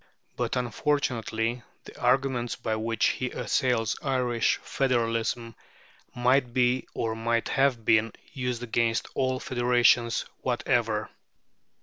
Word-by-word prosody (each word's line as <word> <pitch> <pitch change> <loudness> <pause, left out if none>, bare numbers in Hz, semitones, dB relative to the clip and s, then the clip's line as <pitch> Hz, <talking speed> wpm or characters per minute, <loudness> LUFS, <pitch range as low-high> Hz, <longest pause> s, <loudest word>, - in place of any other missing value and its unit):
But - - -2
unfortunately 120 -2 -1 0.2
the - - -13
arguments 125 -1 +1
by 110 -2 -2
which 115 +1 +1
he 130 - -2
assails 120 -4 0
Irish 125 -4 +1
federalism 115 -2 -1 0.6
might 125 0 +2
be, 125 0 +2
or 115 -1 -1
might 115 +1 0
have 135 -5 +1
been, 110 0 +3 0.2
used 125 -2 -3
against 115 -1 0
all 130 -1 0
federations 120 -1 +2
whatever. 120 -3 0
120 Hz, 105 wpm, -27 LUFS, 115-130 Hz, 0.6 s, been